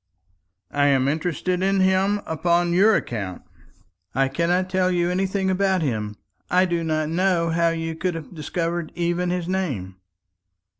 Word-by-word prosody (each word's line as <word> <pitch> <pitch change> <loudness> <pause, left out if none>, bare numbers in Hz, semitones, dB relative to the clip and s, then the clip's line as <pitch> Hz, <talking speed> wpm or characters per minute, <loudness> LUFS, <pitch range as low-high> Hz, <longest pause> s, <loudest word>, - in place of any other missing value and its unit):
"I 145 0 +2
am 135 -2 +3
interested 175 +4 -1
in 195 +1 +2
him 190 +2 +2
upon 170 +2 +1
your 205 +4 +5
account." 100 -6 -3 0.7
"I 135 0 +2
cannot 170 +6 +1
tell 185 0 +1
you 175 -1 +1
anything 190 +1 0
about 190 -2 +1
him. 105 -6 -2 0.3
I 185 +1 +4
do 170 -2 -1
not 155 -1 0
know 170 -1 +1
how 170 +1 +2
you 165 0 -3
could 180 +1 -2
have 165 +2 -8
discovered 170 +1 -3
even 175 +1 0
his 175 -1 -2
name." 135 - -3
175 Hz, 150 wpm, -23 LUFS, 155-185 Hz, 0.7 s, your